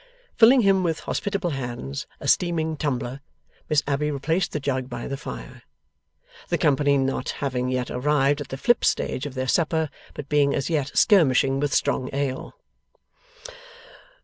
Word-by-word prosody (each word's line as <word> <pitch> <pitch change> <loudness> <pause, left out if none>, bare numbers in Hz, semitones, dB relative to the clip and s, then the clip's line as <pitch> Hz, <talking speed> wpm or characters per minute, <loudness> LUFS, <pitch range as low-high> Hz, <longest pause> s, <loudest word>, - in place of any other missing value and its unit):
Filling 245 +3 +7
him, 195 -2 +3
with 165 -3 -1
hospitable 200 -4 -2
hands, 120 - -5
a - - -6
steaming 160 -3 +1
tumbler, 135 -3 -3 0.5
Miss 150 -2 +3
Abbey 145 +1 0
replaced 160 +5 -1
the 150 - -2
jug 130 -2 -2
by 120 -1 -5
the 140 - -3
fire; 60 - -8 0.9
the - - +1
company 140 0 +3
not 135 0 -1
having 125 -2 -2
yet 125 -1 -2
arrived 145 +2 +1
at 145 - -6
the 135 - -6
flip 240 - +2
stage 130 - 0
of 140 - -10
their 130 0 -2
supper, 160 +1 +1 0.2
but 145 - -7
being 145 -1 +2
as 140 +4 -2
yet 145 -4 0
skirmishing 135 - +4
with 145 0 0
strong 130 - 0
ale. 140 - -3
140 Hz, 155 wpm, -24 LUFS, 130-160 Hz, 0.9 s, Filling